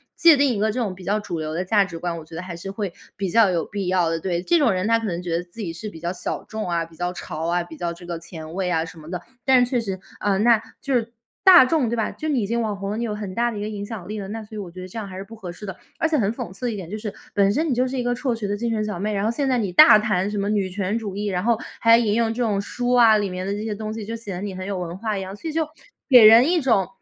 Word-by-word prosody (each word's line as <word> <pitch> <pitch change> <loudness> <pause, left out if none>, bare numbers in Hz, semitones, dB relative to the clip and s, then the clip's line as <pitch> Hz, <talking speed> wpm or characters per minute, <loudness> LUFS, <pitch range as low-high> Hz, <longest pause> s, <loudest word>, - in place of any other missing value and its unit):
界 335 -2 +7
定 280 -1 +3
一 - - -2
个 215 +1 +2
这 245 - -3
种 205 -6 -2
比 185 - -12
较 205 +4 0
主 180 -5 -5
流 155 0 -4
的 175 +3 -1
价 200 +1 +3
值 170 -3 -8
观， 170 -1 -3
我 160 - -9
觉 160 - -16
得 165 - -4
还 180 -1 -7
是 180 +3 -7
会 200 -2 -3 0.3
比 195 -1 -2
较 215 0 +4
有 170 -2 0
必 200 -2 -4
要 180 -2 +2
的。 165 0 -1
对， 175 0 -2
这 340 - +3
种 285 -8 +3
人 185 +3 -1
她 230 - +4
可 225 - -4
能 175 -4 -2
觉 170 -2 -1
得 175 - -3
自 180 +6 -11
己 170 -5 -4
是 210 +6 -6
比 165 - -11
较 170 +1 -2
小 180 - -4
众 220 -2 -5
啊、 170 -1 0
比 165 0 -18
较 175 +1 -2
潮 160 -2 -5
啊， 175 +1 +1
比 165 -2 -11
较 170 -1 -2
这 175 +1 -13
个 170 -1 -3
前 165 -1 -9
卫 190 -1 -1
啊 160 -2 +1
什 165 - -12
么 155 -1 -12
的， 180 - -4 0.2
但 260 -2 +6
是 245 - -1
确 250 - +1
实， 195 -5 -4 0.2
呃， 200 -2 +1
那 230 +1 +5 0.2
就 275 - -2
是 230 -1 0 0.3
大 370 -6 +10
众 265 -3 +1
对 235 - -1
吧， 220 -2 0
就 310 - -6
你 280 -6 +1
已 200 - -2
经 235 +3 0
网 215 -3 -1
红 195 0 -5
了， 210 - -2
你 235 - -2
有 225 -3 -2
很 205 -3 -6
大 240 +1 +1
的 215 - -6
一 - - -4
个 210 - -3
影 205 -1 -5
响 205 -4 -7
力 215 +1 -4
了， 195 - -6
那 225 +2 -5
所 215 0 -11
以 - - -4
我 185 -4 -7
觉 185 +1 -9
得 185 - -7
这 185 - -10
样 215 -3 -4
还 190 - -9
是 190 - -5
不 225 +3 -12
合 190 -5 -7
适 180 - -13
的。 190 -3 -6 0.2
而 325 - +2
且 315 - +2
很 210 -5 +1
讽 185 - -6
刺 195 +7 -7
的 240 - 0
一 - - -4
点 185 -5 -7
就 210 - -4
是， 210 -1 -5 0.2
本 200 0 +4
身 315 +5 0
你 - - +2
就 250 +1 +2
是 265 - -4
一 - - -1
个 245 0 0
辍 250 0 -1
学 225 -3 -3
的 205 +1 -2
精 235 +2 -2
神 215 -1 0
小 210 -3 -3
妹， 210 +2 -1
然 200 -1 -1
后 215 - +1
现 270 +4 -1
在 255 -2 +2
你 200 -5 -1
大 215 +4 +8
谈 205 -3 0
什 210 - -2
么 200 +1 -1
女 205 -3 +1
权 200 +2 -1
主 210 -4 -5
义， 205 +1 -2
然 185 -2 -1
后 235 0 +3 0.2
还 230 0 +6
引 215 -3 +1
用 230 -1 +1
这 245 - -3
种 210 -4 +1
书 245 +5 -2
啊， 230 -3 +6
里 205 -2 -1
面 185 0 -4
的 200 - -1
这 205 +1 -4
些 220 -1 -3
东 215 +1 -5
西 225 - -5
就 225 +3 -5
显 210 -5 -6
得 - - -6
你 200 -2 -4
很 185 0 -6
有 195 -1 -3
文 175 0 -5
化 215 +1 -2
一 - - -4
样， 190 +1 -6
所 265 - -8
以 - - -2
就 320 -1 0 0.4
给 250 -4 +9
人 230 +7 +8
一 355 - +3
种 230 - +2
205 Hz, 380 characters per minute, -23 LUFS, 185-230 Hz, 0.4 s, 大